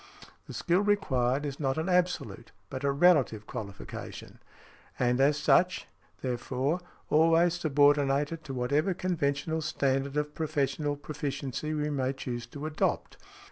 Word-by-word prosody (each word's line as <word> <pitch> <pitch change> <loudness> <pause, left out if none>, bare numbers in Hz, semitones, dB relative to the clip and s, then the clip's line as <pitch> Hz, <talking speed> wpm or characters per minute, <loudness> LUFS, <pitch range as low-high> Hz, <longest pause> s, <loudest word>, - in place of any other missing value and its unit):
The - - -8
skill 175 0 +2
required 145 -10 +1
is 140 -1 -5
not 135 -2 0
an 160 +3 -1
absolute 180 - 0 0.2
but 130 0 -5
a 140 - +2
relative 140 -8 +3
qualification; 100 -3 -8 0.6
and 125 +1 +2
as 145 +2 +4
such, 180 +4 +3 0.4
therefore, 130 +5 -1 0.3
always 165 +2 +5
subordinated 145 +1 +2
to 135 - -5
whatever 145 +9 +1
conventional 160 -3 -1
standard 140 -2 0
of 150 0 -1
professional 145 -2 -1
proficiency 145 0 -4
we 150 0 -1
may 135 -2 0
choose 120 -3 -5
to 145 +5 -7
adopt. 155 -1 -1
145 Hz, 130 wpm, -29 LUFS, 135-160 Hz, 0.6 s, always